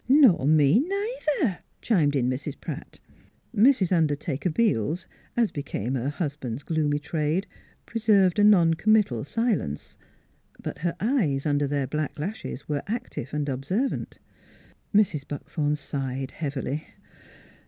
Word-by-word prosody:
" - - -30
Nor 255 - +6
me, 155 +5 +5
neither," 355 - -1 0.2
chimed 155 -10 +2
in 125 -3 +2
Mrs. 130 +2 -3
Pratt. - - -7 0.6
Mrs. 215 -4 +4
Undertaker 155 0 0
Beels, 170 - +1 0.3
as 230 -3 +3
became 135 -4 -3
her 130 +1 -1
hus 145 -1 -3
band's 130 -2 -5
gloomy 150 -2 0
trade, 155 +4 -1 0.4
preserved 210 -5 +3
a - - +5
non 180 -6 +6
committal 195 - +2
silence. 205 - -2 0.6
But - - -6
her 170 0 -1
eyes 195 - +1
under 145 -1 +1
their 140 -1 0
black 150 +1 -3
lashes 190 - -5
were 145 -2 -1
active 225 - -4
and 150 -1 -2
observant. 145 - -2 0.7
Mrs. 200 -8 +3
Buckthorn 150 +1 -2
sighed 135 -2 -4
heavily. 145 -1 -4
155 Hz, 130 wpm, -26 LUFS, 140-210 Hz, 0.7 s, Nor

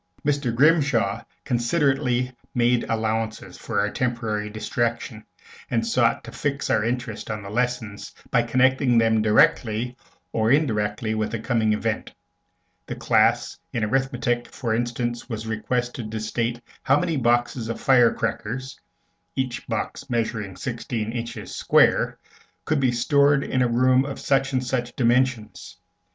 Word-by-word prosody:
Mr. 140 -4 +1
Grimshaw 125 -7 +3 0.2
considerately 125 -1 +1 0.2
made 120 0 +2
allowances 110 -4 -2
for 110 -3 -3
our 105 +1 -1
temporary 115 -4 -2
distraction, 115 +1 -3 0.5
and 115 -1 0
sought 115 0 +2
to - - -9
fix 140 -1 -2
our 110 - +2
interest 120 -1 -3
on 105 -1 -4
the 100 - -8
lessons 120 -3 -2 0.2
by 120 - +4
connecting 130 +1 +3
them 110 -1 +3
directly 110 +2 +2 0.4
or 110 0 +1
indirectly 110 -6 +1
with 110 -1 -1
the 115 - -3
coming 115 -1 +1
Event. 110 +1 -2 0.8
The - - -4
class - - +2
in 115 - -1
arithmetic, 120 0 0
for 115 -4 -3
instance, 120 +1 -2
was 110 -2 -4
requested 120 +1 -2
to 110 0 -4
state 115 +2 -2 0.2
how 140 +2 +3
many 170 -3 -1
boxes 120 -2 +1
of 115 - -4
fire 125 -3 +5
crackers, 120 +3 -4 0.6
each 130 -2 -3
box 115 +4 -4
measuring 110 -5 -2
sixteen 115 -3 -4
inches 115 -2 -6
square, - - +3 0.5
could 155 -1 +1
be 130 -2 +2
stored 140 +3 +3
in 130 - 0
a 125 - +3
room 130 +2 +3
of 140 - -6
such 135 -1 +1
and 130 -1 -1
such 125 -1 -2
dimensions. 125 -2 0
120 Hz, 140 wpm, -24 LUFS, 110-130 Hz, 0.8 s, fire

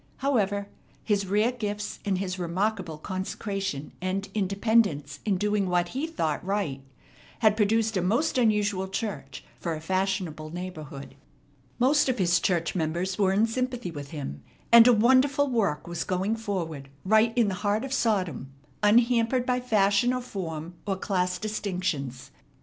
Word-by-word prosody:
However, 205 -7 0 0.4
his 200 -3 0
rare 210 +5 +2
gifts, 210 -4 -4
and 195 -2 0
his 185 -1 -3
remarkable 180 -1 -1
consecration 190 -3 -4
and 190 +2 -2
independence 200 -6 +1
in 200 -3 +1
doing 205 -1 0
what 175 -1 +1
he 270 - -3
thought 160 - -2
right, 185 -8 -2 0.6
had 215 -2 +5
produced 220 +1 +2
a 185 - +1
most 230 - +1
unusual 210 -4 +2
church 190 - -5 0.2
for 165 -2 -2
a - - -6
fashionable 185 -3 -2
neighborhood. 155 -5 -7 0.6
Most 270 +3 +3
of 255 - 0
his 175 -3 +3
church 170 -3 0
members 175 +3 -2
were 195 -2 +3
in 205 +3 +3
sympathy 245 -3 -2
with 145 -3 -7
him, 135 - -6 0.3
and 235 0 +9
a - - +8
wonderful 260 +5 +4
work 210 - 0
was 170 -1 -3
going 190 +4 -1
forward 170 -11 -4 0.2
right 220 +3 +4
in 235 -3 +4
the - - -2
heart 210 +4 0
of 270 - -4
Sodom, 185 - 0 0.3
unhampered 235 +3 +3
by 250 0 +1
fashion 215 0 +2
or 250 - -2
form 170 -7 -6
or 195 - +1
class 180 -1 -1
distinctions. 180 - -3
195 Hz, 150 wpm, -27 LUFS, 175-225 Hz, 0.6 s, and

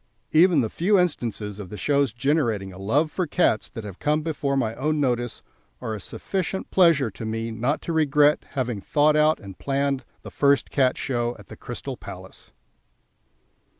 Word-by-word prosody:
Even 165 -1 +5
the 110 - -1
few 200 +4 +2
instances 115 - -1
of 100 -3 -7
the 105 - -7
shows 140 -1 +1
generating 120 -6 0
a 95 - -11
love 145 +11 +1
for 180 -3 -1
cats 145 -8 +1
that 115 - -8
have 100 -3 -9
come 150 +1 +1
before 145 -3 -1
my 115 -4 0
own 150 +5 -1
notice 120 -4 -1 0.4
are 110 - -4
a 105 - -5
sufficient 190 - -4
pleasure 165 - +4
to 105 - -9
me 115 +1 -3
not 120 +7 -1
to 170 - -3
regret 150 -1 +3
having 125 -7 -2
thought 150 +6 +3
out 155 +1 +4
and 95 -3 -11
planned 140 -1 0 0.2
the - - -9
first 140 -1 +2
Cat 130 -2 +2
Show 120 -2 -1
at - - -15
the - - -9
Crystal - - -7
Palace. - - -11
140 Hz, 180 wpm, -24 LUFS, 115-155 Hz, 0.4 s, Even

